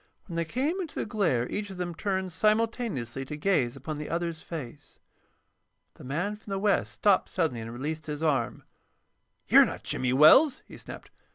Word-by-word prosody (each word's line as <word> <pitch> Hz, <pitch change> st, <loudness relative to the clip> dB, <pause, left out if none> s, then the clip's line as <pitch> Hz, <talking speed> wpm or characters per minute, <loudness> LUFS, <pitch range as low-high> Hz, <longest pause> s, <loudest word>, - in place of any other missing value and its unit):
When 170 Hz, -, -8 dB
they 170 Hz, 0 st, 0 dB
came 290 Hz, -, -1 dB
into 335 Hz, -, -7 dB
this -, -, -2 dB
glare 170 Hz, -, 0 dB
each 205 Hz, 0 st, -4 dB
of 190 Hz, -, -8 dB
them 175 Hz, -1 st, -3 dB
turned 190 Hz, +1 st, -2 dB
simultaneously 215 Hz, -, 0 dB
to 150 Hz, +3 st, -6 dB
gaze 145 Hz, -8 st, +1 dB
upon 150 Hz, +3 st, -6 dB
the 150 Hz, -, -6 dB
other's 170 Hz, -1 st, -2 dB
face. 145 Hz, -3 st, -8 dB, 1.0 s
The -, -, -14 dB
man 170 Hz, +11 st, -2 dB
from 210 Hz, 0 st, -15 dB
the 195 Hz, -, -1 dB
West 200 Hz, +1 st, +1 dB
stopped 200 Hz, -3 st, +2 dB
suddenly 160 Hz, -10 st, -1 dB
and 115 Hz, +1 st, -7 dB
released 155 Hz, +6 st, -5 dB
his 150 Hz, +1 st, -4 dB
arm. 140 Hz, -7 st, 0 dB, 0.8 s
"You're -, -, +8 dB
not -, -, -4 dB
Jimmy 125 Hz, -1 st, -1 dB
Wells," 155 Hz, -, +6 dB
he -, -, -11 dB
snapped. -, -, -10 dB
165 Hz, 180 wpm, -28 LUFS, 140-205 Hz, 1.0 s, You're